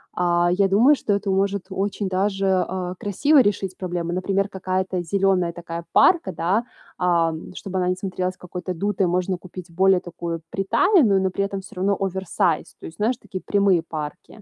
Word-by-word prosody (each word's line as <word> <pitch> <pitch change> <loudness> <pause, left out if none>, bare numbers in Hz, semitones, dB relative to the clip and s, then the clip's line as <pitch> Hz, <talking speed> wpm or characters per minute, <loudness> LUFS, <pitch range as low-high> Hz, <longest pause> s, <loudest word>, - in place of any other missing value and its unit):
а, 175 0 +2
я 195 +2 +3
думаю, 230 +10 +5
что 215 - -1
это 200 0 -1
может 195 0 0
очень 200 +1 -2
даже, 195 +1 0 0.2
а, 180 0 -4
красиво 280 +9 +3
решить 195 -4 -1
проблему. 175 -2 -3
Например, 195 +2 0
какая-то 185 -1 -2
зеленая 185 -1 +1
такая 170 0 -7
парка, 335 - +4
да, 185 +8 0 0.3
ам, 170 -2 0
чтобы 190 -1 -5
она 180 -1 +1
не 180 - +1
смотрелась 185 -1 -3
какой-то 180 +1 -6
дутой, 195 +2 0
можно 180 +1 0
купить 180 0 -10
более 190 +2 +4
такую 170 -2 -6
приталенную, 200 - +3
но 190 - +1
при 195 +2 -2
этом 195 -1 -4
всё 195 - -14
равно 195 +2 +1
оверсайз. 190 -4 -1
То - - -8
есть, 160 - -12
знаешь, 225 +4 0
такие 190 -7 -7
прямые 200 -4 +3
парки. 155 +6 -7
185 Hz, 175 wpm, -23 LUFS, 180-200 Hz, 0.3 s, думаю